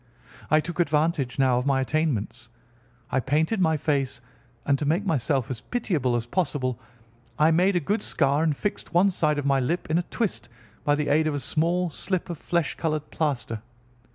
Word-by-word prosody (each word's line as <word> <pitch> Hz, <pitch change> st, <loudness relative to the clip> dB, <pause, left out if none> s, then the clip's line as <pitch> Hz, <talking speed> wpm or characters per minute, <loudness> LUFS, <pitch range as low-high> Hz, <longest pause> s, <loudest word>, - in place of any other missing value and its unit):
I 155 Hz, +1 st, +5 dB
took 170 Hz, +2 st, -7 dB
advantage 150 Hz, -5 st, +1 dB
now 130 Hz, -2 st, +3 dB
of 125 Hz, -, -3 dB
my 135 Hz, -1 st, +3 dB
attainments. 130 Hz, -5 st, -1 dB, 0.6 s
I 135 Hz, -, +2 dB
painted 155 Hz, -, +1 dB
my 160 Hz, -3 st, +3 dB
face, 140 Hz, -4 st, -1 dB, 0.5 s
and 140 Hz, -1 st, +2 dB
to 150 Hz, -, -2 dB
make 170 Hz, +7 st, +1 dB
myself 135 Hz, -, 0 dB
as 125 Hz, -, -5 dB
pitiable 160 Hz, -, -1 dB
as 115 Hz, -1 st, -1 dB
possible 130 Hz, -, -1 dB, 0.6 s
I 155 Hz, +2 st, +5 dB
made 180 Hz, +4 st, +3 dB
a -, -, +4 dB
good 205 Hz, +8 st, -1 dB
scar 140 Hz, 0 st, +1 dB
and 155 Hz, -3 st, +1 dB
fixed 205 Hz, -4 st, -4 dB
one 190 Hz, +3 st, +5 dB
side 155 Hz, -4 st, +1 dB
of 145 Hz, -, -2 dB
my 135 Hz, -1 st, +3 dB
lip 155 Hz, +5 st, -2 dB
in 165 Hz, -, +3 dB
a -, -, -1 dB
twist 220 Hz, -, -2 dB, 0.3 s
by 145 Hz, -, +3 dB
the 150 Hz, 0 st, -1 dB
aid 155 Hz, +1 st, +3 dB
of 150 Hz, -, 0 dB
a -, -, -1 dB
small 170 Hz, +4 st, 0 dB
slip 180 Hz, +3 st, -3 dB
of 170 Hz, -, -7 dB
flesh 170 Hz, -4 st, 0 dB
coloured 155 Hz, -2 st, -3 dB
plaster. 130 Hz, -8 st, -2 dB
155 Hz, 190 wpm, -25 LUFS, 135-170 Hz, 0.6 s, I